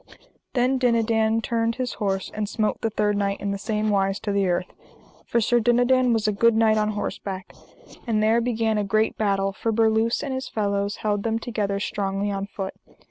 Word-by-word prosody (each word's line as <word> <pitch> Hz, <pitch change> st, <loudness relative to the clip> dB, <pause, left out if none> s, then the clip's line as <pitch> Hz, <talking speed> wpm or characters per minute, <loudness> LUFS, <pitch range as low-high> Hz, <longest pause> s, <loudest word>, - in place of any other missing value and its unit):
Then 255 Hz, +1 st, +2 dB
Dinadan 225 Hz, -2 st, +2 dB
turned 230 Hz, 0 st, 0 dB
his 255 Hz, -1 st, -3 dB
horse, 195 Hz, -2 st, -1 dB
and 210 Hz, -1 st, -3 dB
smote 215 Hz, -2 st, -1 dB
the 225 Hz, -, 0 dB
third 210 Hz, -1 st, 0 dB
knight 200 Hz, -1 st, -1 dB
in 200 Hz, -, -2 dB
the 200 Hz, -, -3 dB
same 215 Hz, 0 st, -1 dB
wise 195 Hz, 0 st, +1 dB
to 205 Hz, -, -2 dB
the 200 Hz, -1 st, +1 dB
earth, 175 Hz, 0 st, -1 dB, 0.5 s
for 235 Hz, -, +1 dB
Sir 240 Hz, +2 st, +3 dB
Dinadan 245 Hz, +2 st, +3 dB
was 225 Hz, -2 st, +1 dB
a -, -, +3 dB
good 230 Hz, +3 st, +3 dB
knight 220 Hz, -1 st, +4 dB
on 215 Hz, 0 st, +1 dB
horseback; 195 Hz, -2 st, -5 dB, 0.5 s
and 215 Hz, -2 st, +1 dB
there 225 Hz, +2 st, +3 dB
began 225 Hz, -2 st, 0 dB
a -, -, 0 dB
great 215 Hz, +2 st, +1 dB
battle, 195 Hz, -2 st, 0 dB
for 225 Hz, +3 st, -2 dB
Berluse 225 Hz, +2 st, +2 dB
and 275 Hz, -2 st, -3 dB
his 260 Hz, 0 st, -4 dB
fellows 200 Hz, -1 st, -1 dB
held 205 Hz, -1 st, +1 dB
them 225 Hz, +1 st, 0 dB
together 210 Hz, -4 st, -2 dB
strongly 200 Hz, 0 st, -2 dB
on 195 Hz, 0 st, -3 dB
foot. 195 Hz, -2 st, -5 dB
215 Hz, 195 wpm, -24 LUFS, 200-230 Hz, 0.5 s, knight